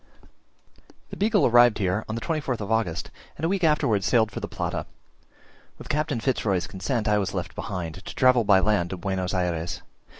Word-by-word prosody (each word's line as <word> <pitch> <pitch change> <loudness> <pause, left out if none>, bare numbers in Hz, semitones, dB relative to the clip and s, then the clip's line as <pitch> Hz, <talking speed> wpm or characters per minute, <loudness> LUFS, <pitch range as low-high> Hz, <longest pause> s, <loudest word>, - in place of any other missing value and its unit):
The - - -6
Beagle 210 -1 +2
arrived 120 -1 +5
here 95 +2 0
on 110 - -2
the 115 - -4
24th 140 -3 -2
of 105 0 -5
August, 95 -8 -1 0.3
and 160 - -2
a - - +3
week 190 0 -1
afterwards 115 - +2
sailed 110 -3 +3
for - - -5
the - - -5
Plata. - - -4 0.9
With - - -11
Captain 145 -4 0
Fitz 130 +2 -1
Roy's 95 -5 0
consent 110 +4 -3
I 105 0 +3
was 95 -3 -3
left - - -4
behind, 90 -1 -5
to - - -8
travel 130 -2 +4
by 100 -2 +5
land 100 -4 +1
to 95 - -5
Buenos 95 0 -2
Ayres. 90 -2 -2
105 Hz, 195 wpm, -25 LUFS, 95-125 Hz, 0.9 s, arrived